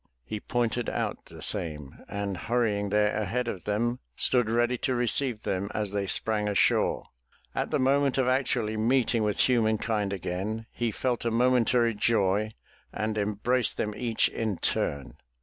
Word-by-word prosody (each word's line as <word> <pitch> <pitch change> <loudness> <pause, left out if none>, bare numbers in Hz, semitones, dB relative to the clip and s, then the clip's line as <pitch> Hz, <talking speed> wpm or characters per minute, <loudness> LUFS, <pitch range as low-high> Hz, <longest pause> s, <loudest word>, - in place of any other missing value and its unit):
He 110 - -4
pointed 120 0 -1
out - - -3
the - - -11
same, 75 -4 -4
and, 100 -1 -3
hurrying 105 -1 0
there 105 +1 +2
ahead 115 +4 -1
of 95 -6 -5
them, 120 +4 0 0.2
stood 125 -4 +2
ready 120 +2 +2
to 130 - 0
receive 120 -1 +1
them 95 +2 -2
as 105 -2 -1
they 100 -1 -1
sprang 105 +1 +1
ashore. 100 - +2 0.5
At - - -1
the - - +1
moment 135 0 +2
of 130 -2 +2
actually 125 -4 +1
meeting 120 +1 +2
with 105 -1 +1
humankind 110 -4 +1
again, 100 +4 -3
he 120 -1 -1
felt 125 +2 -1
a 120 - +1
momentary 120 0 +3
joy 105 -1 +1 0.4
and 110 0 -2
embraced 105 +4 0
them 105 - -1
each 115 -2 +1
in 110 -5 -2
turn. 70 -1 -2
110 Hz, 155 wpm, -28 LUFS, 105-120 Hz, 0.5 s, momentary